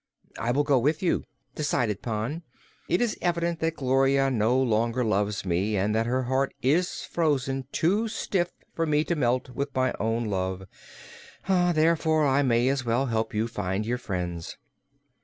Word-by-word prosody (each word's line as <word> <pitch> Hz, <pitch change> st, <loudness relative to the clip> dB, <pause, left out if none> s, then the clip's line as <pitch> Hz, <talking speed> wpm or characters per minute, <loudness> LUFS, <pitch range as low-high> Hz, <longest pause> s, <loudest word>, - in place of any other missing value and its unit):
"I 115 Hz, -, -2 dB
will 140 Hz, +4 st, +2 dB
go 140 Hz, -3 st, +3 dB
with 150 Hz, +8 st, 0 dB
you," 180 Hz, -, +1 dB, 0.3 s
decided 120 Hz, -9 st, -1 dB
Pon. 120 Hz, +8 st, -3 dB, 0.5 s
"It 175 Hz, -, +2 dB
is 235 Hz, -3 st, 0 dB
evident 170 Hz, -1 st, 0 dB
that 165 Hz, 0 st, -1 dB
Gloria 135 Hz, 0 st, +2 dB
no 120 Hz, +2 st, +2 dB
longer 115 Hz, 0 st, +1 dB
loves 105 Hz, -1 st, 0 dB
me 95 Hz, +4 st, 0 dB
and 100 Hz, +3 st, +1 dB
that 110 Hz, +1 st, +1 dB
her 130 Hz, +2 st, 0 dB
heart 130 Hz, +2 st, 0 dB
is 165 Hz, +8 st, +1 dB
frozen 135 Hz, -5 st, -1 dB
too 205 Hz, +8 st, +1 dB
stiff 190 Hz, -5 st, -1 dB, 0.2 s
for 165 Hz, -1 st, -1 dB
me 150 Hz, 0 st, +2 dB
to 170 Hz, -, -1 dB
melt 125 Hz, -3 st, 0 dB
it 125 Hz, -, -13 dB
with 140 Hz, 0 st, -3 dB
my 130 Hz, 0 st, +1 dB
own 115 Hz, +2 st, 0 dB
love; 95 Hz, -2 st, -2 dB, 0.8 s
therefore 165 Hz, -4 st, +3 dB
I 140 Hz, 0 st, +3 dB
may 120 Hz, -2 st, +2 dB
as 135 Hz, -1 st, +1 dB
well 120 Hz, +3 st, +1 dB
help 110 Hz, -3 st, -2 dB
you 110 Hz, +2 st, +1 dB
to 115 Hz, -, -16 dB
find 95 Hz, +1 st, -2 dB
your 120 Hz, +2 st, -1 dB
friends." 90 Hz, -6 st, -4 dB
130 Hz, 175 wpm, -26 LUFS, 110-155 Hz, 0.8 s, go